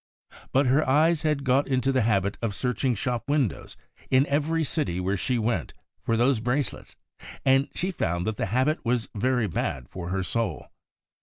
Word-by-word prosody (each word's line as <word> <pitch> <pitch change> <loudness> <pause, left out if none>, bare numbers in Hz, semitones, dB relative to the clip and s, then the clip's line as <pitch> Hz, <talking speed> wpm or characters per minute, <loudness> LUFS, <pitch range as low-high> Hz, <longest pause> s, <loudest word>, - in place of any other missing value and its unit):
But 135 +2 +3
her 135 +4 +3
eyes 155 +3 +4
had 150 -3 0
got 135 +1 +2
into 130 0 +1
the 130 - +2
habit 100 -3 +1
of 110 -4 -2
searching 125 0 0
shop 120 +5 -3
windows 140 - -1 0.3
in 130 +1 +4
every 155 +3 0
city 100 - -1
where 95 +2 0
she 125 +5 -1
went 110 -7 -1 0.3
for 115 - 0
those 120 +1 +3
brace 125 +5 0
lets, - - -13 0.5
and 135 +1 +4
she 185 +2 -1
found 85 - -1
that 110 -1 -2
the - - -1
habit 130 +9 +1
w'as 120 -1 -1
very 125 +2 +1
bad 65 -8 -3
for 90 -2 -6
her 95 +1 -1
soul. 110 -3 -2
125 Hz, 180 wpm, -26 LUFS, 105-140 Hz, 0.5 s, eyes